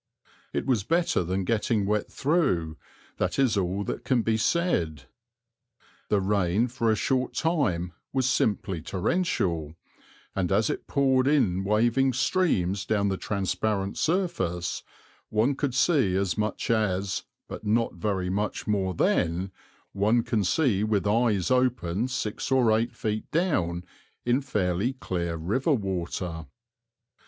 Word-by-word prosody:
It - - -2
was 120 -7 +1
better 165 - +1
than 95 +3 -1
getting 105 0 +1
wet 105 +1 -1
through, 135 - +1 0.4
that - - -1
is 135 -5 +3
all 95 +1 0
that - - -4
can 125 -4 +1
be 115 - +1
said. 100 - 0 1.1
The 105 - +3
rain 100 +3 +1
for 115 -2 0
a 110 - +4
short 130 +2 0
time 105 - 0 0.2
was 130 -1 +1
simply 95 -8 0
torrential, 90 - -1 0.6
and 95 -2 0
as 105 +2 +2
it - - -6
poured 135 -2 +2
in 110 -11 +2
waving 120 +6 +2
streams 110 - +1
down 100 -1 +1
the 95 - 0
transparent 100 0 -1
surface, 155 - -1 0.5
one 110 +6 +2
could 135 -2 -2
see 130 - +3
as 95 -1 0
much 105 +2 -1
as, 100 -4 0 0.2
but - - -8
not 115 +2 +1
very 90 0 -2
much 105 +2 -2
more 95 -3 0
than, 85 +4 +1 0.4
one 110 +4 +2
can 110 -3 0
see 105 - +2
with 105 -2 +1
eyes 105 -2 +2
opened 125 -4 +1
six 110 -5 -3
or 120 -5 +4
eight 115 +1 -1
feet 110 0 -3
down 90 - 0 0.4
in 120 +3 +2
fairly 100 -1 0
clear 85 -9 -3
river 110 - 0
water. 90 - -3
105 Hz, 135 wpm, -27 LUFS, 95-130 Hz, 1.1 s, a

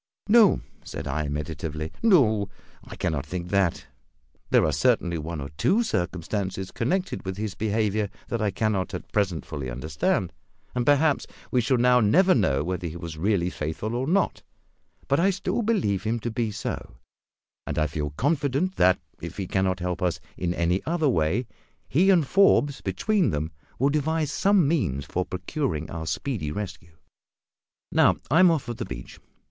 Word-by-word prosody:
"No," 215 -2 +6 0.2
said - - -6
I, 75 +2 -1
meditatively, 75 +1 -4
"no; 115 - +4 0.3
I - - -10
cannot 75 -4 -1
think 85 +4 -5
that. 95 -3 +1 0.6
There - - +4
are - - +1
certainly 85 -2 +1
one 80 +1 -5
or 70 0 -5
two 220 +6 +3
circumstances 95 - -2
connected 180 +5 -1
with 95 0 -4
his 105 -2 -3
behaviour 105 -1 0 0.2
that 115 - -1
I 105 - +2
cannot 100 -3 -1
at 90 - -8
present 95 -8 0
fully 65 -3 -5
understand, 70 +5 -1 0.4
and 125 -1 -1
perhaps 145 +1 +3 0.2
we 125 - +3
shall 120 +3 +2
now 125 +1 +5
never 180 - +5
know 70 - +2
whether 90 +1 -3
he 80 - -7
was 85 -2 -6
really 90 +1 +1
faithful 80 +9 -4
or 125 +2 -1
not; 195 +5 +1 0.7
but 140 - +2
I 190 +4 +4
still 195 +5 -1
believe 195 - +1
him 115 +2 -1
to 120 - -3
be 115 -1 -1
so, 100 -10 -5 0.7
and - - -3
I 75 - +3
feel 75 0 -3
confident 145 - 0
that, 90 0 +4 0.2
if - - -7
he 95 - -2
cannot 95 0 0
help 90 0 -2
us 90 -2 0 0.2
in 90 -1 -2
any 85 +3 +1
other 160 -3 +2
way, 90 +5 +1 0.4
he 180 +7 +3
and 175 -6 +5
Forbes 145 -5 +3
between 210 -5 +1
them 75 +1 -2 0.3
will 135 +3 +3
devise 155 +1 0
some 195 -4 +3
means 70 - 0
for 90 - -2
procuring 90 - -3
our 80 -1 -5
speedy 80 - -2
rescue. 85 -4 -7 0.9
Now, - - +5 0.2
I 160 - +5
am 185 -1 +8
off 160 -4 +1
for 120 - -5
the - - -5
beach. - - -8
105 Hz, 170 wpm, -26 LUFS, -, 0.9 s, am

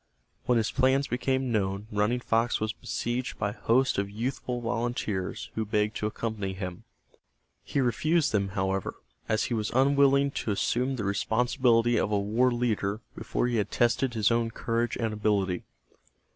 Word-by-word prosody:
When 125 - +3
his 110 -1 +1
plans 135 +2 +3
became 130 +1 0
known 100 -2 -1
Running 105 +4 +1
Fox 115 0 +1
was 110 0 -1
besieged 120 +2 -3
by 100 -1 -1
a - - -14
host 130 -1 +2
of 100 0 -1
youthful 125 +3 -3
volunteers 115 -5 -2
who 110 - -1
begged 105 0 0
to 105 - -1
accompany 105 -3 -3
him. 90 -2 -6 0.8
He - - -2
refused 155 +6 +2
them, 100 -2 +1
however, 95 0 -1 0.3
as 110 -1 +2
he - - -2
was 110 -2 -1
unwilling 140 +1 +4
to - - -4
assume 125 +6 0
the 115 - -3
responsibility 120 +3 +2
of 105 - 0
a 105 - +3
war 110 +6 +2
leader 110 -3 -1
before - - -2
he 120 -1 0
had 105 - 0
tested 120 +1 +1
his 110 0 +3
own 115 0 +1
courage 115 +1 -1
and 115 -2 -1
ability. 100 -4 0
115 Hz, 165 wpm, -28 LUFS, 105-125 Hz, 0.8 s, unwilling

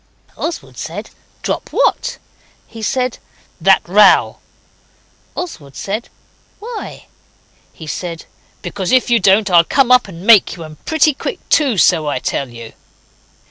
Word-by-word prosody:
Oswald 330 0 -6
said, - - -7 0.3
'Drop - - -3
what?' - - 0 0.5
He 225 - -11
said, 250 +2 -1 0.4
'That - - +3
row.' - - +4 1.0
Oswald 155 - -7
said, 210 +4 -4 0.5
'Why?' 450 +1 -8 0.7
He 160 - -12
said, 165 +1 -6 0.4
'Because 185 +1 -4
if 255 -1 +3
you 235 - +5
don't 200 +1 +3
I'll 170 -1 +6
come 255 +7 +2
up 250 -3 +5
and 180 -1 -10
make 220 -4 +6
you, 170 - -9
and 155 -1 -13
pretty 315 -1 +3
quick - - -5
too, 275 -9 +2
so 165 -4 +3
I 145 - -1
tell 130 +1 -3
you. 115 -1 -11
205 Hz, 140 wpm, -16 LUFS, 165-255 Hz, 1.0 s, I'll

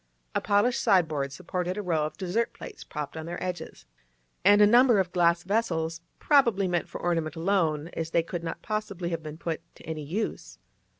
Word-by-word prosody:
A - - 0
polished 210 +5 +2
sideboard 160 - +2
supported 180 +4 -3
a 210 - -3
row 160 -4 +1
of - - -12
dessert 200 +5 -1
plates - - -10
propped 150 -1 -6
on 160 0 -6
their 175 +1 -4
edges, 180 - -6 0.6
and 205 +2 +6
a 210 - +8
number 240 +2 +6
of 185 -2 0
glass 170 -1 +3
vessels, 165 -6 -1 0.2
probably 235 -10 +3
meant 175 -1 -1
for - - -7
ornament 165 -2 -1
alone, 165 -3 +1
as 165 -2 -4
they 165 0 +2
could 170 0 -5
not 165 - -5
possibly 200 -5 -3
have 165 -1 -3
been 155 0 -8
put 165 -1 -3
to - - -16
any 160 -1 -4
use. 170 +2 -4
175 Hz, 190 wpm, -27 LUFS, 160-200 Hz, 0.6 s, a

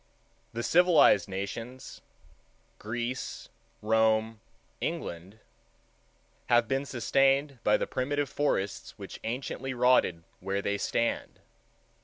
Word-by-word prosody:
The 115 +1 -4
civilized 170 - +5
nations—Greece, 115 +2 -7 0.3
Rome, 110 0 +2 0.4
England—have 110 - -4
been 135 +3 -1
sustained 135 +3 +2
by 105 - +4
the - - -1
primitive 145 +2 -1
forests 105 -10 -2
which 100 -2 -9
anciently 130 +2 -4
rotted 120 -9 +3 0.2
where 100 +2 -2
they 100 0 -1
stand. 115 +3 -1
115 Hz, 85 wpm, -29 LUFS, 105-135 Hz, 0.4 s, civilized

